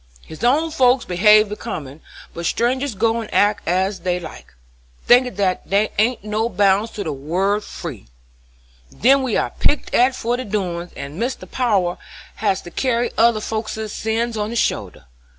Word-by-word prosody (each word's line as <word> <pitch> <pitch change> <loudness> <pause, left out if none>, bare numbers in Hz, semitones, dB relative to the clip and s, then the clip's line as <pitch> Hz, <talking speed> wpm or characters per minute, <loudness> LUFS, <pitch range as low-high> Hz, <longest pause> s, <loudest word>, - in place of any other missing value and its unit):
His 160 +7 -10
own 300 +7 +2
folks 255 -4 +3
behave 210 +4 +5
becomin', 160 - -7 0.3
but 170 0 -3
strangers 255 +1 0
go 225 +3 +1
and 220 - -9
act 205 0 +2
as 190 +3 0
they 180 -1 -1
like, 165 -3 -11 0.5
thinkin' 250 -2 +4
that 190 -2 -1
there 205 +2 +2
ain't 230 0 +1
no 215 +2 -1
bounds 200 +2 +2
to 205 - -4
the 155 - -3
word 185 +9 -1
free. 140 - -8 0.8
Then 270 - +3
we 255 -5 0
are - - -1
picked 290 - 0
at 255 +1 +4
for 240 0 -1
their 255 - -5
doin's, 180 -4 -3
and 145 +7 -7
Mr. 250 +2 -3
Power 200 -9 0 0.4
has 200 -2 0
to 175 - -10
carry 245 +3 0
other 230 -1 +4
folkses' 220 0 -4
sins 225 +1 -2
on 210 0 -2
his 235 - -4
shoulders. 210 - -1
215 Hz, 170 wpm, -20 LUFS, 185-240 Hz, 0.8 s, behave